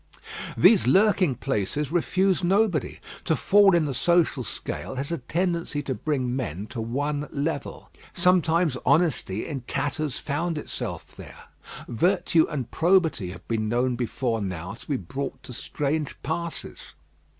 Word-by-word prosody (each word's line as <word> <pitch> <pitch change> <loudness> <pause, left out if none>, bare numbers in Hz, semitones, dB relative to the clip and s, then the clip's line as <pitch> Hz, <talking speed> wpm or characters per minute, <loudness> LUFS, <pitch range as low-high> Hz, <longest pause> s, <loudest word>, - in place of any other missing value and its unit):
These 210 - +6
lurking 190 -2 +4
places 135 +3 -2
refuse 185 +2 +1
nobody. 190 - +1 0.3
To 160 - +2
fall 200 +2 +5
in 165 -2 +3
the 140 - -2
social 170 -2 +2
scale 130 - -6
has 140 +4 -3
a 170 - -1
tendency 170 +1 -1
to 135 - -2
bring 130 -3 -1
men 100 - -3
to 115 - -4
one 145 +6 -2
level. 145 +1 -4 0.2
Sometimes 170 -4 +3
honesty 145 - +2
in 140 -4 -4
tatters 145 0 -2
found 160 +3 -2
itself 150 - -6
there. - - -12 0.4
Virtue 170 - +2
and 135 -6 -4
probity 165 - +2
have 95 - -10
been 110 -2 -1
known 125 +2 +1
before 120 -1 -1
now 90 -1 -4
to - - -14
be 140 - 0
brought 135 +2 -5
to 125 - -9
strange 145 +4 -2
passes. 165 +3 -5
145 Hz, 140 wpm, -25 LUFS, 125-170 Hz, 0.4 s, These